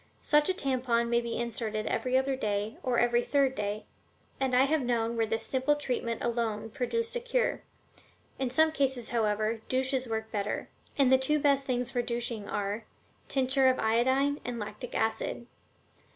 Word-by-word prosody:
Such 295 Hz, +2 st, +4 dB
a -, -, +3 dB
tampon 245 Hz, -5 st, 0 dB
may 235 Hz, 0 st, +3 dB
be 235 Hz, -1 st, -3 dB
inserted 225 Hz, -3 st, -2 dB
every 255 Hz, 0 st, +1 dB
other 265 Hz, 0 st, +1 dB
day 210 Hz, -3 st, -2 dB
or 250 Hz, -2 st, 0 dB
every 240 Hz, 0 st, +3 dB
third 275 Hz, -1 st, +2 dB
day, 210 Hz, -2 st, -3 dB, 0.5 s
and 265 Hz, -2 st, +1 dB
I 255 Hz, -, +6 dB
have 300 Hz, +2 st, +2 dB
known 235 Hz, -2 st, 0 dB
where 225 Hz, -1 st, +1 dB
this 225 Hz, +1 st, -2 dB
simple 265 Hz, +3 st, +1 dB
treatment 245 Hz, -5 st, -2 dB
alone 225 Hz, -2 st, -1 dB
produced 460 Hz, -, -1 dB
a -, -, 0 dB
cure. -, -, 0 dB, 0.8 s
In 265 Hz, -2 st, 0 dB
some 315 Hz, +5 st, +4 dB
cases, 265 Hz, -5 st, 0 dB
however, 220 Hz, -1 st, 0 dB
douches 260 Hz, 0 st, 0 dB
work 220 Hz, 0 st, -3 dB
better, 205 Hz, -1 st, -2 dB, 0.3 s
and 270 Hz, -3 st, +4 dB
the 260 Hz, -, +6 dB
two 300 Hz, +3 st, +2 dB
best 280 Hz, -2 st, +2 dB
things 245 Hz, -1 st, -1 dB
for 245 Hz, -, 0 dB
douching 235 Hz, -3 st, -3 dB
are: 205 Hz, +2 st, -2 dB, 0.4 s
tincture 265 Hz, 0 st, +3 dB
of 255 Hz, 0 st, +4 dB
iodine 260 Hz, +6 st, +2 dB
and 245 Hz, -1 st, -4 dB
lactic 230 Hz, +3 st, -6 dB
acid. 220 Hz, +2 st, -1 dB
245 Hz, 170 wpm, -29 LUFS, 225-270 Hz, 0.8 s, I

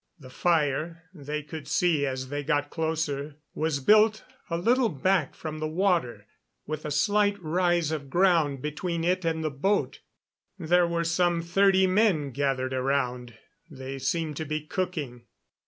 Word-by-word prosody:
The 130 Hz, -3 st, -13 dB
fire, 165 Hz, +1 st, 0 dB
they 150 Hz, -2 st, -5 dB
could 150 Hz, 0 st, -8 dB
see 160 Hz, -5 st, +2 dB
as 130 Hz, -1 st, -4 dB
they 145 Hz, +1 st, -3 dB
got 145 Hz, -1 st, 0 dB
closer, 155 Hz, -3 st, -2 dB, 0.2 s
was 155 Hz, -3 st, -1 dB
built 215 Hz, +7 st, +4 dB, 0.3 s
a 170 Hz, -, -1 dB
little 235 Hz, +6 st, +2 dB
back 175 Hz, +1 st, 0 dB
from 155 Hz, -1 st, -6 dB
the 155 Hz, -, -2 dB
water, 155 Hz, -, 0 dB, 0.4 s
with 155 Hz, 0 st, -5 dB
a -, -, -2 dB
slight 205 Hz, +5 st, +2 dB
rise 175 Hz, -1 st, +1 dB
of 145 Hz, -3 st, -4 dB
ground 165 Hz, -5 st, +2 dB
between 165 Hz, +3 st, -3 dB
it 180 Hz, +2 st, +1 dB
and 160 Hz, -1 st, -1 dB
the 155 Hz, -, -1 dB
boat. 195 Hz, +10 st, 0 dB, 0.6 s
There 175 Hz, 0 st, +3 dB
were 170 Hz, 0 st, -1 dB
some 170 Hz, 0 st, +1 dB
thirty 190 Hz, +2 st, +3 dB
men 185 Hz, -7 st, +2 dB
gathered 130 Hz, -1 st, -1 dB
around; 125 Hz, -3 st, -1 dB, 0.3 s
they 135 Hz, -2 st, -7 dB
seemed 160 Hz, -1 st, -2 dB
to 160 Hz, -, -3 dB
be 155 Hz, 0 st, -3 dB
cooking. 150 Hz, -10 st, -4 dB
160 Hz, 155 wpm, -27 LUFS, 140-180 Hz, 0.6 s, built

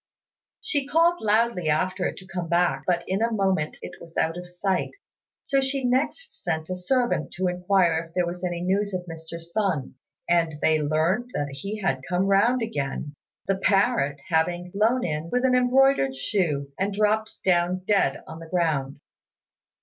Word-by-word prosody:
She 285 Hz, -2 st, -1 dB
called 335 Hz, +3 st, +3 dB
loudly 215 Hz, -5 st, +2 dB
after 180 Hz, +4 st, 0 dB
it -, -, -6 dB
to 185 Hz, -, -11 dB
come 180 Hz, -2 st, -5 dB
back, 175 Hz, +1 st, +1 dB
but 175 Hz, -1 st, +1 dB
in 190 Hz, +3 st, -1 dB
a 230 Hz, +1 st, +2 dB
moment 190 Hz, -7 st, 0 dB
it -, -, -9 dB
was 165 Hz, -1 st, -12 dB
out 165 Hz, +1 st, +1 dB
of 180 Hz, 0 st, -8 dB
sight; 185 Hz, -, -1 dB, 0.5 s
so 275 Hz, -1 st, +1 dB
she 265 Hz, 0 st, -1 dB
next 270 Hz, -, -1 dB
sent 160 Hz, +2 st, -2 dB
a -, -, -1 dB
servant 240 Hz, -, 0 dB
to 185 Hz, +3 st, -2 dB
inquire 180 Hz, -2 st, +2 dB
if 165 Hz, -, -25 dB
there 180 Hz, -1 st, +2 dB
was 175 Hz, +1 st, -6 dB
any 175 Hz, -1 st, -2 dB
news 195 Hz, +2 st, 0 dB
of 180 Hz, -1 st, -4 dB
Mr. 165 Hz, 0 st, -8 dB
Sun, 170 Hz, -4 st, -2 dB, 0.3 s
and 170 Hz, -2 st, +2 dB
then 155 Hz, -2 st, +2 dB
learnt 170 Hz, +10 st, +1 dB
that 145 Hz, -1 st, -1 dB
he 195 Hz, +10 st, -6 dB
had 135 Hz, -8 st, 0 dB
come 180 Hz, +1 st, +1 dB
round 225 Hz, +5 st, +3 dB
again, 145 Hz, -7 st, -3 dB, 0.3 s
the 195 Hz, -1 st, 0 dB
parrot 195 Hz, -, +2 dB
having 175 Hz, +2 st, 0 dB
flown 225 Hz, +6 st, +2 dB
in 155 Hz, 0 st, -3 dB
with 250 Hz, +5 st, +1 dB
an 255 Hz, -, +3 dB
embroidered 250 Hz, -, +3 dB
shoe 140 Hz, -2 st, -1 dB
and 195 Hz, +1 st, -1 dB
dropped 215 Hz, +1 st, +1 dB
down 180 Hz, 0 st, +2 dB
dead 195 Hz, -10 st, +1 dB
on 160 Hz, -, -9 dB
the 165 Hz, -1 st, -11 dB
ground. 155 Hz, -6 st, 0 dB
180 Hz, 175 wpm, -25 LUFS, 165-215 Hz, 0.5 s, called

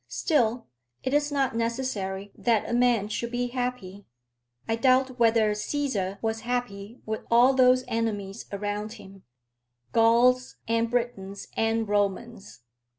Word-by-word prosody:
Still, 240 Hz, -7 st, 0 dB, 0.4 s
it 260 Hz, -, -2 dB
is 290 Hz, 0 st, +2 dB
not 270 Hz, -4 st, 0 dB
necessary 225 Hz, -5 st, -3 dB
that 230 Hz, -3 st, +1 dB
a -, -, -3 dB
man 240 Hz, -4 st, +2 dB
should 235 Hz, +2 st, -3 dB
be 245 Hz, 0 st, -2 dB
happy. 245 Hz, -6 st, -4 dB, 0.6 s
I 225 Hz, -, +1 dB
doubt 255 Hz, +1 st, +2 dB
whether 225 Hz, -2 st, +4 dB
Cæsar 210 Hz, -4 st, -2 dB
was 225 Hz, 0 st, -1 dB
happy 230 Hz, -2 st, -4 dB
with 220 Hz, 0 st, -3 dB
all 245 Hz, +3 st, +5 dB
those 255 Hz, -1 st, +4 dB
enemies 205 Hz, -4 st, -3 dB
around 205 Hz, +1 st, -3 dB
him, 195 Hz, -4 st, -13 dB, 0.7 s
Gauls, 240 Hz, +3 st, +3 dB
and 230 Hz, 0 st, +1 dB
Britons, 225 Hz, -5 st, -3 dB
and 225 Hz, 0 st, 0 dB
Romans. 205 Hz, -, -2 dB
230 Hz, 130 wpm, -26 LUFS, 205-250 Hz, 0.7 s, all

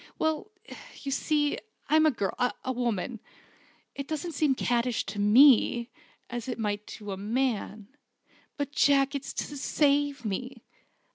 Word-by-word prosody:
"Well 315 Hz, +4 st, -1 dB, 0.5 s
you 275 Hz, -, -3 dB
see, 295 Hz, +1 st, +1 dB, 0.3 s
I'm 315 Hz, +1 st, +5 dB
a -, -, +6 dB
girl 205 Hz, -9 st, -2 dB, 0.3 s
a 260 Hz, -, 0 dB
woman. 235 Hz, -2 st, -2 dB, 0.7 s
It 280 Hz, 0 st, -6 dB
doesn't 315 Hz, +2 st, -3 dB
seem 290 Hz, -3 st, +1 dB
caddish 240 Hz, -1 st, 0 dB
to 200 Hz, +1 st, -6 dB
me, 235 Hz, +2 st, +5 dB, 0.4 s
as 240 Hz, 0 st, -5 dB
it 245 Hz, -, -3 dB
may 210 Hz, -2 st, -1 dB, 0.2 s
to 205 Hz, -2 st, -7 dB
a 190 Hz, -, -4 dB
man. 215 Hz, -1 st, -2 dB, 0.7 s
But, 285 Hz, 0 st, -3 dB
Jack, 280 Hz, -1 st, +3 dB
it's 280 Hz, -1 st, -4 dB
to 290 Hz, -, -4 dB
save 285 Hz, -2 st, +1 dB
me! 235 Hz, +4 st, -4 dB
260 Hz, 140 wpm, -28 LUFS, 225-285 Hz, 0.7 s, a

